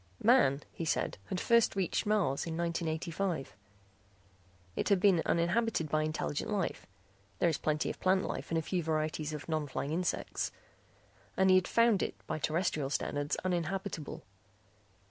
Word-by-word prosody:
Man, 210 - +5
he - - -5
said, 160 - -1
had 185 - -2
first 235 0 +3
reached 190 +1 0
Mars 185 -10 +1
in 165 0 -3
1985. 165 - -2 1.2
It - - -1
had 200 -2 +4
been 185 -3 +5
uninhabited 175 0 +1
by 155 +1 +2
intelligent 155 -1 -2
life 200 -4 -2 0.5
(there 175 - +3
is 160 - -1
plenty 150 -1 0
of - - -11
plant 185 0 +3
life - - -4
and 165 - 0
a 160 - 0
few 180 +2 -1
varieties 155 -1 -1
of 150 -2 -6
non 155 -2 -1
flying 140 +1 -3
insects) 175 +2 -1 0.9
and 190 0 +5
he - - +7
had 185 -1 +3
found 230 -4 +4
it - - -2
by - - -3
terrestrial 155 -3 0
standards 145 0 -1
uninhabitable. 180 -2 -2
170 Hz, 155 wpm, -32 LUFS, 155-190 Hz, 1.2 s, he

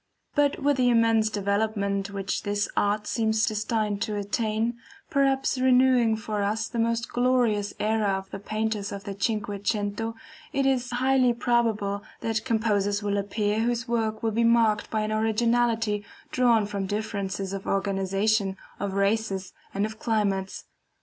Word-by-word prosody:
But 290 -1 +2
with 285 0 +1
the 250 -1 +3
immense 225 -2 +3
development 200 -1 -1
which 200 0 -3
this 205 0 -1
art 205 +1 +1
seems 220 -1 +1
destined 215 -1 -1
to 215 -2 -1
attain, 220 +3 -1 0.3
perhaps 270 -2 +2
renewing 255 -3 +4
for 215 -1 -3
us 215 +2 0
the 230 0 -1
glorious 240 -5 +1
era 215 0 +1
of 190 0 -9
the - - -5
Painters 215 0 -2
of 200 0 -6
the 200 - -5
CINQUE 205 -1 -2
CENTO, 210 +2 -1 0.4
it 275 -1 +1
is 255 -2 +1
highly 255 0 +3
probable 225 -4 0 0.2
that 225 -1 -1
composers 205 -3 +1
will 205 0 0
appear 205 +1 -1
whose 235 0 0
works 220 -2 -1
will 225 - +1
be 230 +2 +1
marked 230 -2 +3
by 220 - 0
an 215 0 -2
originality 225 -1 +1 0.3
drawn 235 -4 +3
from 200 -2 -3
differences 200 -2 -3
of 195 -1 -5
organization, 195 +1 0 0.2
of 200 -1 -2
races, 200 -1 0 0.2
and 200 +1 0
of 220 0 -7
climates. 200 -4 -1
215 Hz, 150 wpm, -26 LUFS, 205-230 Hz, 0.4 s, renewing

